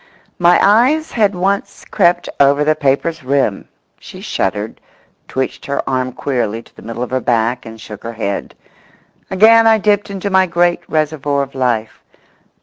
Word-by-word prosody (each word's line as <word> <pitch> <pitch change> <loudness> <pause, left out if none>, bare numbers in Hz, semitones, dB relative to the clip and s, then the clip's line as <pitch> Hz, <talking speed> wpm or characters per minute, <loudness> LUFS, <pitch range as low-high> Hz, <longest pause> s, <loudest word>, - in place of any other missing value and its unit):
My 175 0 +5
eyes 255 +10 +3
had 205 -4 +1
once 195 +2 -2
more - - -22
crept 175 -4 +2
over 140 +1 +4
the 155 +1 +3
paper's 155 +2 -1
rim 130 -6 0 0.3
She - - -12
shuddered, 105 +3 -3 0.5
twitched 130 0 -4
her 140 - -2
arm 130 -1 -1
queerly 120 -4 -2
to - - -24
the - - -14
middle 115 +2 -5
of 125 - -6
her 130 - 0
back 120 0 0
and 110 0 -10
shook 105 -1 -10
her 115 0 -6
head. 100 -3 -4 0.7
Again 225 +4 +5
I 220 0 +5
dipped 205 -1 +1
into 200 0 -4
my 190 0 +4
great 175 0 +1
reservoir 150 -2 0
of 135 - -9
life. 120 -4 -2
145 Hz, 165 wpm, -16 LUFS, 125-190 Hz, 0.7 s, My